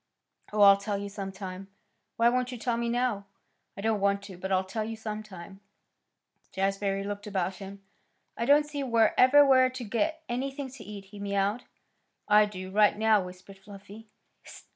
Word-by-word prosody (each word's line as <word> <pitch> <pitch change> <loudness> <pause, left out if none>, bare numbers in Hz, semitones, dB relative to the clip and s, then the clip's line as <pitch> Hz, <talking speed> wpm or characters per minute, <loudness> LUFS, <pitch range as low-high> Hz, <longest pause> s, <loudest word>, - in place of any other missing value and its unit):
"Oh, 210 0 0
I'll 200 -1 +8
tell 200 0 -3
you 200 0 -5
some 195 -1 -6
time." 190 0 -8 0.5
"Why 230 - +4
won't 250 +1 +1
you 250 - -6
tell 235 0 -1
me 235 0 -2
now?" 235 -4 -1 0.5
"I - - -5
don't 220 0 0
want 200 0 +1
to; 195 -2 -10
but 190 +2 -6
I'll 190 0 +2
tell 215 +4 -4
you 225 +1 -5
some 215 -1 -5
time." 195 -2 -12 0.9
Jazbury 195 0 -1
looked 205 0 -6
about 190 -2 -2
him. 195 0 -10 0.5
"I 235 - -2
don't 290 +3 +5
see 295 -1 -5
wherever 255 +3 +5
we're 260 -1 +5
to 255 -1 -7
get 310 +9 -2
anything 270 +2 -4
to 255 -4 -11
eat," 205 -2 -9
he 200 +1 -13
mewed. 200 +3 -1 0.6
"I 210 0 +6
do, 185 -2 -8
right 210 +1 +4
now," 220 -1 +3
whispered 185 +2 -12
Fluffy. 200 +2 -13
210 Hz, 180 wpm, -28 LUFS, 195-235 Hz, 0.9 s, I'll